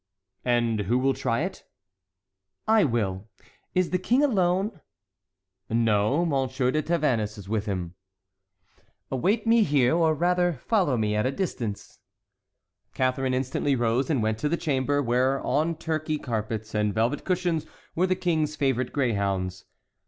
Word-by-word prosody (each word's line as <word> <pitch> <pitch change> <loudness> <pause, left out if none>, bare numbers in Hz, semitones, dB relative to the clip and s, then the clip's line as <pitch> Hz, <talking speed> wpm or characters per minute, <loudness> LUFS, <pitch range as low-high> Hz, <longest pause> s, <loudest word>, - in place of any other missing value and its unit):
"And 120 -3 +1
who 120 - +3
will 135 +1 +2
try 115 +1 -1
it?" 185 +3 -4 1.0
"I 220 -1 +5
will! 105 -6 -1 0.5
Is 185 -1 +1
the 185 - +1
King 245 +9 +2
alone?" 190 - +1 0.9
"No; 115 +6 +2
M. 140 -6 +1 0.2
de 155 - +1
Tavannes 135 -11 0
is 100 -2 -10
with 110 +1 -2
him." 90 -4 -3 1.2
"Await 195 - +1
me 230 0 +5
here; 145 - +3
or, 160 -2 +3
rather, 175 +2 +2
follow 185 - +2
me 105 -1 0
at 105 +4 +1
a - - 0
distance." 125 - -4 1.0
Catharine 130 0 0
instantly 135 +2 0
rose 120 +2 0
and 135 -8 +1
went 110 0 0
to 150 - 0
the 170 - 0
chamber, 145 -3 0
where 130 +3 +1
on 155 +5 +1
Turkey 155 -1 -2
carpets 110 -4 -4
and 105 -1 0
velvet 115 +6 0
cushions 175 -3 -1 0.3
were 180 +3 +1
the 185 - +1
King's 155 -4 0
favorite 130 -3 0
greyhounds. 100 -8 -1
135 Hz, 145 wpm, -26 LUFS, 115-170 Hz, 1.2 s, I